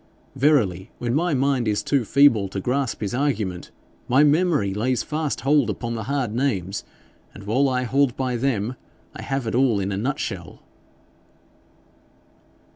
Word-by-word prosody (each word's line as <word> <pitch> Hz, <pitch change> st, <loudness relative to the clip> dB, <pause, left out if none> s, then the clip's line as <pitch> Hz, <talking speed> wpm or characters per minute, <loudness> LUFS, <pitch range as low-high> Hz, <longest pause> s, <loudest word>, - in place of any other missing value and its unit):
Verily, 125 Hz, -, +2 dB
when 120 Hz, -1 st, -2 dB
my 165 Hz, +2 st, +1 dB
mind 135 Hz, -3 st, +1 dB
is 105 Hz, -1 st, 0 dB
too 140 Hz, -4 st, +1 dB
feeble 120 Hz, -5 st, +4 dB
to 95 Hz, -, -4 dB
grasp 130 Hz, +4 st, -1 dB
his 105 Hz, 0 st, -3 dB
argument, 115 Hz, -10 st, -2 dB, 0.4 s
my 135 Hz, +4 st, +4 dB
memory 150 Hz, -, +2 dB
lays 120 Hz, +5 st, 0 dB
fast 155 Hz, -1 st, -3 dB
hold 145 Hz, -1 st, +3 dB
upon 120 Hz, -1 st, -3 dB
the 110 Hz, -2 st, -4 dB
hard 135 Hz, -6 st, -1 dB
names, 105 Hz, -7 st, -1 dB, 0.5 s
and 100 Hz, -, -10 dB
while 130 Hz, +7 st, +2 dB
I 125 Hz, -1 st, 0 dB
hold 135 Hz, +1 st, +1 dB
by 130 Hz, -2 st, -1 dB
them, 120 Hz, -2 st, -1 dB, 0.4 s
I -, -, -7 dB
have 135 Hz, -2 st, -3 dB
it 110 Hz, -, -3 dB
all 125 Hz, -4 st, +3 dB
in 100 Hz, +1 st, -2 dB
a 95 Hz, -, -2 dB
nutshell.' 130 Hz, +7 st, -4 dB
125 Hz, 155 wpm, -23 LUFS, 105-140 Hz, 0.5 s, feeble